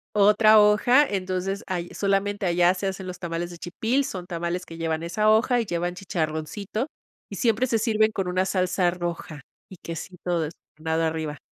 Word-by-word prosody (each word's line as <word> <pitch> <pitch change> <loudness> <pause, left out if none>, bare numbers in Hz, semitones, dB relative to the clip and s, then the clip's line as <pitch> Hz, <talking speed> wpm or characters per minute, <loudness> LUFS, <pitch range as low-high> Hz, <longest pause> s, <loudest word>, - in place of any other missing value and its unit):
Otra 210 +1 +6
hoja, 215 +7 +5
entonces, 190 0 -2
ahí 175 -2 -3
solamente 200 0 0
allá 175 0 +4
se 190 +1 -3
hacen 190 0 -4
los 180 - -7
tamales 170 0 -4
de 175 - -9
chipil, 225 +11 -1
son 185 -8 -5
tamales 175 +1 -3
que 165 - -10
llevan 165 -1 -2
esa 215 +6 +1
hoja, 230 +3 +4
y 230 - -1
llevan 175 -1 -2
chicharroncito, 185 - -3 0.4
y - - -7
siempre 235 +1 +1
se 230 -2 +1
sirven 220 -1 +2
con 195 -3 -2
una 185 +1 +1
salsa 185 -1 +1
roja 170 -3 -5 0.3
y 190 - -11
quesito 175 +1 -4
des 160 0 -3 0.3
nado 160 +1 0
arriba. 160 -2 -2
185 Hz, 175 wpm, -25 LUFS, 170-210 Hz, 0.4 s, Otra